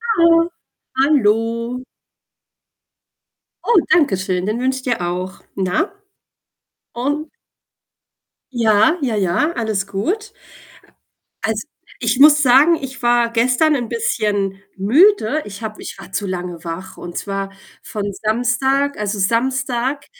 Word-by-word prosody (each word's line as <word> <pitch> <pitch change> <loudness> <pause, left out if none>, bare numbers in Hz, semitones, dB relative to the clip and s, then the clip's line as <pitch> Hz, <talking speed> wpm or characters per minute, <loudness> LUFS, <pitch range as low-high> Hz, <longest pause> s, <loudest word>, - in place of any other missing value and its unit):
Hallo. 335 -1 +4 0.5
Hallo. 230 -3 +1 1.8
Oh, 470 - +3 0.2
danke 295 - +3
schön, 185 -1 -2
den 215 +3 -1
wünsche 260 +1 0
ich 260 - -8
dir 240 -6 -1
auch. 180 +2 -4
Na? 185 - 0 1.0
Und? 290 +6 -2 1.2
Ja, 225 +5 +3
ja, 245 -5 0
ja, 205 - +1
alles 215 -4 -1
gut. 360 - -3 1.1
Also, 220 -1 -2 0.3
ich 235 +2 0
muss 300 +1 +7
sagen, 280 +5 +6
ich 265 -1 -7
war 240 -1 +3
gestern 250 +7 +3
'n 240 -4 -3
bisschen 205 - -1
müde. 300 - +3
Ich 200 +1 -9
habe 215 -1 -6
ich - - -7
war - - -12
zu 195 +2 -2
lange 180 -2 -5
wach, 170 +2 -7
und 175 -1 -7
zwar 195 -1 -4 0.3
von 205 -1 -4
Samstag 245 +5 +1
also, 210 0 -2
Samstag, 255 +5 0
235 Hz, 120 wpm, -19 LUFS, 200-275 Hz, 1.8 s, muss